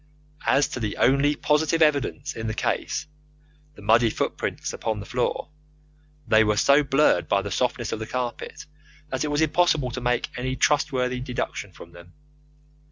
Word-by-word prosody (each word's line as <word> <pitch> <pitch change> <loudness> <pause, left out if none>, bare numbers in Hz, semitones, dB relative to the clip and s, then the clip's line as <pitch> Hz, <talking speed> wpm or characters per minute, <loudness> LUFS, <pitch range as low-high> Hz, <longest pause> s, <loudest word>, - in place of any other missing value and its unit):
As 140 - +4
to - - -5
the 110 -3 -3
only 140 +3 +3
positive 160 +3 +2
evidence 145 -1 0
in 115 0 -4
the 110 - -3
case - - -2 0.7
the - - -14
muddy 115 +1 +4
footmarks - - -3
upon 110 -2 -3
the 100 - -7
floor 125 +4 -2 0.8
they 110 0 +5
were 105 -1 +1
so 140 +6 +5
blurred 145 +1 +2
by 100 0 +1
the 100 - -5
softness 120 +1 -1
of - - -3
the 110 - -5
carpet 125 +4 -5 0.4
that 130 0 -2
it - - -1
was 145 +1 0
impossible 160 -4 +2
to 125 - -5
make 125 0 0
any 130 +1 -3
trustworthy 130 -3 +1
deduction 125 -5 -4
from 85 -1 -13
them. 85 +1 -15
125 Hz, 165 wpm, -24 LUFS, 110-145 Hz, 0.8 s, they